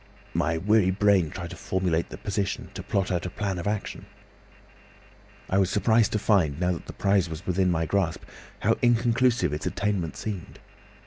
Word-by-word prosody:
My 80 -1 +1
weary 100 +2 +3
brain 95 -3 +3
tried 85 +1 -7
to - - -7
formulate 90 -3 -1
the - - -8
position, 100 -1 -3
to - - -6
plot 100 -1 -1
out 90 0 -1
a - - -4
plan 95 -1 -3
of 85 - -4
action. 105 0 -3 1.4
"I 95 - +2
was 95 -2 +2
surprised 110 +2 +3
to - - +2
find, 90 -9 +2
now 90 0 +1
that 85 - -6
my - - -7
prize 100 -3 +2
was 80 +3 -7
within 90 0 +1
my 80 -2 +1
grasp, 90 -2 -1 0.4
how - - +2
inconclusive 120 - +2
its 75 - -3
attainment 100 -5 -2
seemed. 100 -6 -6
95 Hz, 180 wpm, -26 LUFS, 85-105 Hz, 1.4 s, weary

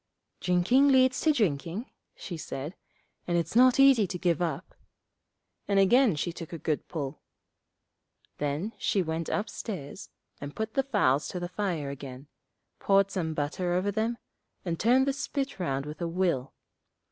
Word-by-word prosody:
'Drinking 190 +10 +3
leads 260 -1 +4
to 315 - +4
drinking,' 190 - -1 0.2
she 175 - -7
said, 150 0 -6 0.5
'and 175 -1 +1
it's 170 +5 -2
not 255 +2 +6
easy 270 -7 +6
to 180 0 -4
give 175 -2 +1
it - - +3
up,' 170 - -4 0.9
and 200 - +1
again 230 - +5
she 170 +3 -2
took 165 -2 -8
a 170 - -5
good 155 -1 -2
pull. 145 -3 -5 1.2
Then 150 +9 -2
she 195 - +1
went 160 0 -3
upstairs 195 - -5 0.3
and 145 0 -7
put 220 0 -3
the 270 - +3
fowls 200 - +1
to 180 - -4
the 175 0 -4
fire 175 -7 -2
again, 135 -1 -8 0.5
poured 195 0 +3
some 160 -4 -2
butter 160 +5 -1
over 185 +3 +1
them, 225 +3 -1 0.5
and 165 -2 -2
turned 255 +4 +4
the 275 - +1
spit 275 -3 -3
round 140 -6 -1
with 150 +2 -8
a 170 - 0
will. 170 -7 -1
180 Hz, 160 wpm, -28 LUFS, 155-220 Hz, 1.2 s, not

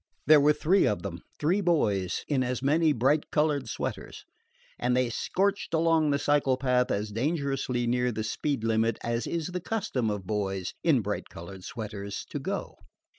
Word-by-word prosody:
There 150 0 +7
were 150 +1 +5
three 170 +6 +3
of 105 - -1
them, 90 -3 -5 0.2
three 175 +7 +1
boys, 105 - +1
in 140 -3 +1
as 125 0 -2
many 155 +3 +3
bright 140 +4 +1
colored 150 -5 +1
sweaters, - - -5 0.5
and 125 0 +1
they 125 -2 +1
"scorched" 195 - 0
along 160 -1 +3
the 140 - +2
cycle 145 -3 +2
path 125 -1 +1
as 105 +1 -2
dangerously 135 -1 -1
near 125 +1 +1
the 110 -1 -3
speed 135 +3 -2
limit 115 0 +1
as 115 0 -1
is 170 0 -2
the 180 0 -4
custom 165 - -1
of 105 -3 -3
boys 95 -2 -2
in 150 -8 +4
bright 105 0 -4
colored 90 +3 -10
sweaters 100 -2 -6
to - - -3
go. - - -4
125 Hz, 175 wpm, -28 LUFS, 110-150 Hz, 0.5 s, There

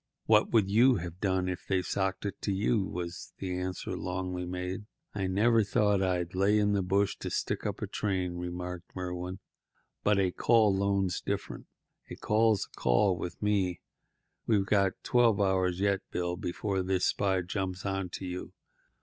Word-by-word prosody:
"What 105 -1 +4
would 110 -5 +3
you 120 +6 +5
have 85 -1 -5
done 95 -2 0
if 90 -1 -4
they'd 95 -1 +1
socked 95 0 -1
it 100 - -4
to 100 - -1
you?" 100 +2 +1
was 85 0 -6
the 90 -2 -3
answer 90 0 -3
Longley 90 -1 -3
made. 90 +3 -4 0.3
"I 95 -2 -1
never 110 +4 +3
thought 105 -1 +2
I'd 90 -2 0
lay 100 +3 +3
in 105 -1 +2
a 100 - +2
bush 100 +2 +1
to - - -5
stick - - -2
up - - -4
a - - +1
train," 95 -4 -2
remarked 90 0 -6
Merwin; 90 0 -4 0.7
"but 105 -1 +3
a 95 -2 +2
call 110 0 +4
loan's 95 -2 0
different. - - -4 0.4
A - - -6
call's 110 -1 +2
a - - -20
call - - +3
with 90 +3 -6
me. 100 -4 +1 0.7
We've 105 -4 +3
got 100 -2 +2
twelve 120 -4 +3
hours 95 -2 +1
yet, 100 -1 +2
Bill, 90 0 -2
before 95 +2 -2
this 95 0 +1
spy 95 -2 +1
jumps 95 +1 -4
onto 95 -1 -3
you. 90 0 -6
95 Hz, 170 wpm, -30 LUFS, 90-100 Hz, 0.7 s, you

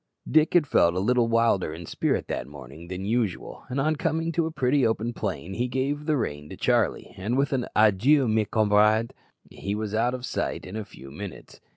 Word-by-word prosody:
Dick 155 +2 +3
had 170 -4 +5
felt 85 -10 +3
a - - 0
little 120 +4 +2
wilder 115 -7 +2
in 85 +1 -8
spirit - - -1
that - - -4
morning 75 +3 -11
than 90 +2 -5
usual, 110 -3 -2
and 130 +2 -2
on 155 +3 +1
coming 165 +2 -1
to 165 0 0
a - - -5
pretty 140 -2 +1
open 115 +1 0
plain 90 -4 -4
he 120 +5 -1
gave 140 +4 -2
the 155 -2 +2
rein 75 - -4
to - - -9
Charlie, - - 0
and 105 +7 -1
with 140 +1 +1
an 125 -2 -1
"Adieu, 115 +7 +4
mes 110 -1 +1
camarade," 110 +1 +3 0.4
he 100 +1 -4
was 105 -1 -4
out 120 +3 +1
of 125 0 -6
sight - - -3
in 90 - -8
a 110 - -3
few 70 -6 -13
minutes. 100 +4 -9
115 Hz, 210 wpm, -26 LUFS, 95-135 Hz, 0.4 s, had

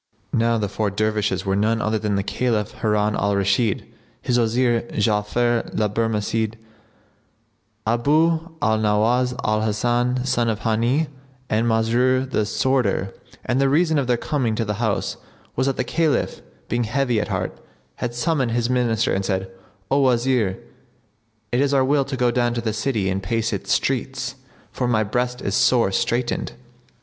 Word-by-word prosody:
Now 115 0 +2
these 105 -3 -2
four 105 -1 0
Dervishes 105 -1 -1
were 95 0 +1
none 110 +3 +1
other 110 -1 0
than 105 -1 -1
the 100 - 0
Caliph 110 -1 -1
Harun 105 -1 +1
al 100 +1 +1
Rashid, 100 +2 +1 0.3
his 125 -1 +1
Wazir 120 +1 +2
Ja'afar 110 +3 +1
the 105 - +1
Barmecide, 110 0 -1 1.3
Abu 155 +8 +2
al 110 0 +2
Nowбs 115 +4 +2
al 110 0 +1
Hasan 120 +4 0
son 120 -3 +1
of 110 -1 -2
Hбni[FN#72] 120 +7 +1 0.4
and 110 +2 +2
Masrur 120 +4 +2
the 110 -5 0
sworder; 115 -6 0 0.3
and 130 +3 +1
the 135 - +3
reason 160 +1 +3
of 135 - -1
their 120 -1 +2
coming 120 -4 -1
to 115 0 -1
the 105 - -1
house 110 -4 -1 0.4
was 130 +2 +1
that 135 - 0
the - - +1
Caliph, 155 +3 0 0.3
being 120 0 0
heavy 125 -1 +1
at - - -3
heart, - - -3 0.4
had 120 -1 -3
summoned 130 -2 0
his 120 +1 0
Minister 120 -3 +1
and 95 - 0
said, 95 0 -2 0.4
"O 140 - +4
Wazir! 120 -6 +2 0.9
it 125 +2 +2
is 140 0 +2
our 135 -1 +4
will 140 0 +2
to 135 -1 -4
go 125 -1 +2
down 120 0 +1
to 120 - -1
the 110 -2 -2
city 110 -2 -1
and 95 +1 -1
pace 115 +4 -1
its - - -3
streets, - - -1 0.4
for 125 - -2
my 110 -3 +2
breast 125 +4 -2
is 100 - -1
sore 115 -2 +3
straitened." 120 +5 -1
115 Hz, 165 wpm, -22 LUFS, 105-125 Hz, 1.3 s, O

